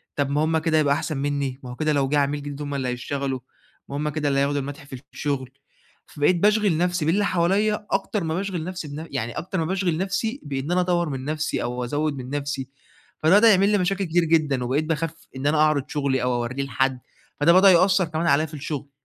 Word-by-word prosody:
طب 140 Hz, -1 st, 0 dB
ما 145 Hz, +2 st, +1 dB
هُم 160 Hz, 0 st, +2 dB
كده 160 Hz, 0 st, +1 dB
يبقى 145 Hz, -2 st, +3 dB
أحسن 155 Hz, -1 st, -3 dB
منّي 140 Hz, -2 st, -2 dB
ما 125 Hz, -, -8 dB
هو -, -, -7 dB
كده 155 Hz, +1 st, 0 dB
لو 135 Hz, -2 st, +1 dB
جِه 150 Hz, -, +2 dB
عميل 145 Hz, +1 st, 0 dB
جديد 145 Hz, 0 st, -6 dB
هُم 145 Hz, -1 st, -4 dB
اللي 130 Hz, -2 st, -2 dB
هيشتغلوا، 135 Hz, +1 st, -3 dB, 0.5 s
ما 140 Hz, -, -5 dB
هُم 150 Hz, +1 st, -1 dB
كده 150 Hz, -1 st, -1 dB
اللي 135 Hz, 0 st, +1 dB
هياخدوا 140 Hz, +1 st, +1 dB
المدح 145 Hz, +2 st, -7 dB
في 130 Hz, -2 st, -9 dB
الشغل، 135 Hz, -3 st, -2 dB, 0.6 s
فبقيت 150 Hz, +4 st, +2 dB
باشغل 210 Hz, -3 st, +3 dB
نفسي 175 Hz, -2 st, 0 dB
باللي 200 Hz, +6 st, +2 dB
حواليّا 200 Hz, +4 st, +1 dB
أكتر 210 Hz, -5 st, -1 dB
ما 160 Hz, 0 st, -2 dB
باشغل 185 Hz, -4 st, -3 dB
نفسي 180 Hz, -4 st, -5 dB
بنف 155 Hz, +3 st, -7 dB
يعني 120 Hz, -4 st, -2 dB
أكتر 185 Hz, +2 st, -4 dB
ما 160 Hz, -, 0 dB
باشغل 180 Hz, -2 st, 0 dB
نفسي 200 Hz, +7 st, -2 dB
بإن 140 Hz, +3 st, -4 dB
أنا 180 Hz, 0 st, +3 dB
أطوّر 175 Hz, -2 st, +1 dB
من 135 Hz, -1 st, -5 dB
نفسي 155 Hz, +1 st, -2 dB
أو 125 Hz, +1 st, -3 dB
أزوّد 145 Hz, +3 st, -1 dB
من 125 Hz, 0 st, -7 dB
نفسي، 140 Hz, -2 st, -3 dB, 0.5 s
فده 160 Hz, +6 st, +5 dB
بدأ 230 Hz, 0 st, +7 dB
يعمل 195 Hz, +1 st, +4 dB
لي 210 Hz, -, +3 dB
مشاكل 195 Hz, +2 st, 0 dB
كتير 170 Hz, +1 st, +2 dB
جدًا 150 Hz, -6 st, +2 dB
وبقيت 140 Hz, +5 st, 0 dB
باخاف 160 Hz, 0 st, -2 dB, 0.2 s
إن 135 Hz, +2 st, -2 dB
أنا 150 Hz, +1 st, +2 dB
أعرض 155 Hz, -2 st, +3 dB
شغلي 140 Hz, -3 st, 0 dB
أو 125 Hz, 0 st, +1 dB
أوريه 125 Hz, +3 st, -2 dB
لحد، 130 Hz, -1 st, 0 dB, 0.4 s
فده 170 Hz, +3 st, +6 dB
بدأ 190 Hz, +1 st, +7 dB
يأثّر 185 Hz, +1 st, +4 dB
كمان 165 Hz, +1 st, -2 dB
عليّا 155 Hz, +2 st, +3 dB
في 155 Hz, -, -12 dB
الشغل. 145 Hz, -1 st, -5 dB
150 Hz, 225 wpm, -24 LUFS, 140-175 Hz, 0.6 s, بدأ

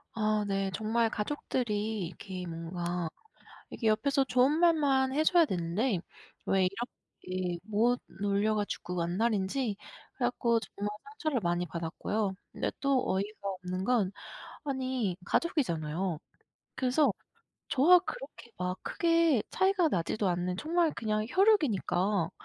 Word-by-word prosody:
아 215 Hz, -1 st, +1 dB
네. 195 Hz, -1 st, 0 dB
정말 225 Hz, +1 st, +1 dB
가족들이 215 Hz, -4 st, -2 dB
이렇게 185 Hz, +1 st, -7 dB
뭔가 170 Hz, 0 st, -3 dB, 0.6 s
이게 230 Hz, -, -6 dB
옆에서 275 Hz, +6 st, +3 dB
좋은 260 Hz, +3 st, +3 dB
말만 285 Hz, -6 st, +3 dB
해줘야 315 Hz, +3 st, +5 dB
되는데 185 Hz, -, 0 dB, 0.5 s
왜 190 Hz, -1 st, +3 dB, 0.6 s
이렇게 180 Hz, -1 st, -3 dB
못 225 Hz, +4 st, +2 dB, 0.2 s
놀려 205 Hz, +2 st, +1 dB
가지고 180 Hz, -4 st, -2 dB
안달인지 210 Hz, +4 st, 0 dB, 0.4 s
그래갖고 240 Hz, -2 st, +1 dB
정말 205 Hz, -2 st, -5 dB
상처를 315 Hz, -, -2 dB
많이 175 Hz, 0 st, 0 dB
받았고요. 190 Hz, +5 st, -2 dB, 0.2 s
근데 -, -, -2 dB
또 275 Hz, -2 st, +2 dB
어이가 200 Hz, +1 st, -3 dB
없는 185 Hz, -1 st, -3 dB
건 215 Hz, -4 st, +2 dB, 0.5 s
아니 255 Hz, -9 st, -1 dB
가족이잖아요. 175 Hz, -, 0 dB, 0.6 s
그래서 260 Hz, +1 st, +3 dB, 0.6 s
저와 320 Hz, +7 st, +7 dB
그렇게 270 Hz, -8 st, -8 dB
막 180 Hz, 0 st, -2 dB
크게 330 Hz, -7 st, +3 dB
차이가 380 Hz, -2 st, +3 dB
나지도 195 Hz, -, 0 dB
않는 180 Hz, +1 st, -1 dB
정말 330 Hz, +2 st, +2 dB
그냥 215 Hz, -1 st, -1 dB
혈육이니까 215 Hz, -, +2 dB
215 Hz, 275 characters per minute, -30 LUFS, 185-270 Hz, 0.6 s, 저와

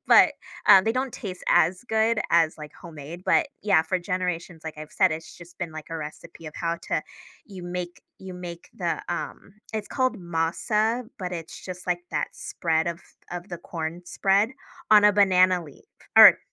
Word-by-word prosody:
But, -, -, +7 dB, 0.3 s
uh, 190 Hz, -, +9 dB
they 220 Hz, -, +1 dB
don't 255 Hz, +1 st, -2 dB
taste 185 Hz, -3 st, -7 dB
as 180 Hz, +7 st, +3 dB
good 220 Hz, +1 st, +2 dB
as, 165 Hz, -2 st, +3 dB
like, 150 Hz, -1 st, -9 dB
homemade. 165 Hz, 0 st, -10 dB
But -, -, +3 dB, 0.2 s
yeah, 195 Hz, -6 st, +4 dB
for 175 Hz, +3 st, -1 dB
generations, 180 Hz, -2 st, -3 dB
like 160 Hz, -1 st, -6 dB
I've 155 Hz, 0 st, -9 dB
said, 185 Hz, -4 st, +3 dB
it's 160 Hz, +1 st, -7 dB
just 175 Hz, 0 st, -14 dB
been, 175 Hz, -3 st, -4 dB
like, 155 Hz, -1 st, -8 dB
a 165 Hz, -, -3 dB
recipe 160 Hz, +2 st, -9 dB
of 155 Hz, -, -8 dB
how 170 Hz, 0 st, -2 dB
to 155 Hz, -, 0 dB, 0.4 s
you 195 Hz, -4 st, -10 dB
make 175 Hz, 0 st, -5 dB, 0.2 s
you 190 Hz, -1 st, -9 dB
make 175 Hz, -1 st, -8 dB
the, 175 Hz, -2 st, -2 dB
um 175 Hz, +3 st, -5 dB, 0.2 s
it's 215 Hz, -2 st, -4 dB
called 255 Hz, -4 st, 0 dB
masa, 195 Hz, +8 st, 0 dB
but 180 Hz, -3 st, -4 dB
it's 165 Hz, -2 st, -7 dB
just, 180 Hz, -1 st, -8 dB
like, 175 Hz, -1 st, 0 dB
that -, -, -1 dB
spread 160 Hz, -1 st, -1 dB
of 170 Hz, +1 st, -5 dB, 0.3 s
of 175 Hz, +2 st, -6 dB
the 175 Hz, -, -6 dB
corn 165 Hz, +1 st, -5 dB
spread 195 Hz, +4 st, +2 dB, 0.4 s
on 210 Hz, -1 st, +8 dB
a 210 Hz, -, +7 dB
banana 185 Hz, -3 st, +4 dB
leaf 145 Hz, -3 st, -15 dB, 0.3 s
or -, -, +11 dB
175 Hz, 185 wpm, -25 LUFS, 165-195 Hz, 0.4 s, or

